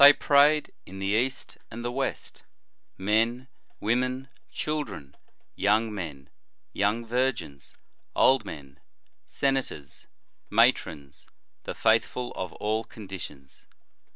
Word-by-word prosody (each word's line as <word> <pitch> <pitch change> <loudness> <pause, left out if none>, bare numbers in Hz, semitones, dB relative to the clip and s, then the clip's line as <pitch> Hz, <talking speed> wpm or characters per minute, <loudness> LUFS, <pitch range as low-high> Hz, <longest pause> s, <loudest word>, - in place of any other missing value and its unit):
105 145 +1 +10
Thus - - -12
prayed, 150 +1 +5 0.2
in 95 - -9
the 95 - -3
East 130 +4 -1
and 120 +1 -7
the 120 - -1
West, 135 +1 -3 0.6
men, 115 +6 +1 0.3
women, 125 +4 0 0.2
children, 105 - -4 0.4
young 105 +2 +2
men, 75 -9 -6 0.5
young 105 +4 +1
virgins, 120 - -2 0.4
old 130 0 +5
men, 70 -1 -9 0.5
senators, 135 - -2 0.4
matrons, 90 - +1 0.4
the - - -4
faith 115 0 +4
ful 125 -1 -5
of 90 -2 -5
all 110 +1 -1
conditions. 95 -12 -10
110 Hz, 110 wpm, -27 LUFS, 95-130 Hz, 0.6 s, 105